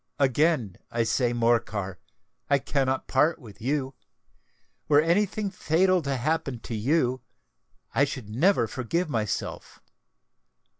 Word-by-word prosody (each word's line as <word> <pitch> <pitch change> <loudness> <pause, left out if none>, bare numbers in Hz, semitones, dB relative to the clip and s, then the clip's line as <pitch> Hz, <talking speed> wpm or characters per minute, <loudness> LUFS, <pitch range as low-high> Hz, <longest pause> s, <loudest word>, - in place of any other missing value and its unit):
"Again, 135 - +2
I 115 0 0
say, 120 +2 +1
Morcar, 115 -5 0
that - - -44 0.5
I 140 - +5
cannot 135 -1 -1
part 150 +5 +2
with 110 -9 -14
you. 135 +2 -1 0.9
Were 145 -1 +5
any 170 +7 +3
thing 205 +1 -4
fatal 185 +1 +2
to 140 -3 -2
happen 140 -2 -1
to 115 - -5
you, 130 +2 +1 0.7
I 140 - +4
should 135 -6 -6
never 125 - +2
forgive 145 +9 -2
myself. 110 -4 -3
135 Hz, 130 wpm, -26 LUFS, 115-160 Hz, 0.9 s, I